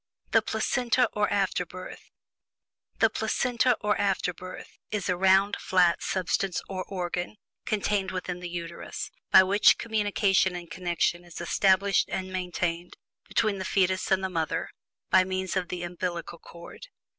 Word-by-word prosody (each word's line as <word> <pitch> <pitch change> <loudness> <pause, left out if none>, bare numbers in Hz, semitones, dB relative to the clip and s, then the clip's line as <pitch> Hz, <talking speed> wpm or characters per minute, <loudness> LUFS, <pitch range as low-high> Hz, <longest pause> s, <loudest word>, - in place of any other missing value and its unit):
THE - - +5
PLACENTA 250 -1 +1
OR 210 0 0
AFTERBIRTH. 185 -2 -3 0.9
The - - +3
Placenta, 250 -1 +1
or 210 0 +1
afterbirth, 185 -2 -3
is 210 -3 -2
a 180 - +2
round, 190 +2 +4
flat 180 -2 +3
substance 185 0 -1
or 185 -1 -4
organ, 180 0 -4 0.3
contained 205 -2 0
within 180 -1 -4
the 180 0 -6
Uterus, 170 -1 -6 0.2
by - - +8
which 200 +2 +5
communication 205 -4 +1
and 175 -1 -8
connection 175 -1 -1
is 175 -1 -10
established 195 +3 +2
and 185 0 -4
maintained 175 -1 -3 0.3
between 215 -3 +1
the - - -3
fetus 185 0 +1
and 190 0 +2
the 190 - -1
mother, 160 -3 -2 0.4
by 185 - +6
means 185 0 -3
of 185 -2 -1
the 175 0 -5
umbillical 175 -1 -4
cord. 170 - -12
185 Hz, 140 wpm, -27 LUFS, 175-200 Hz, 0.9 s, by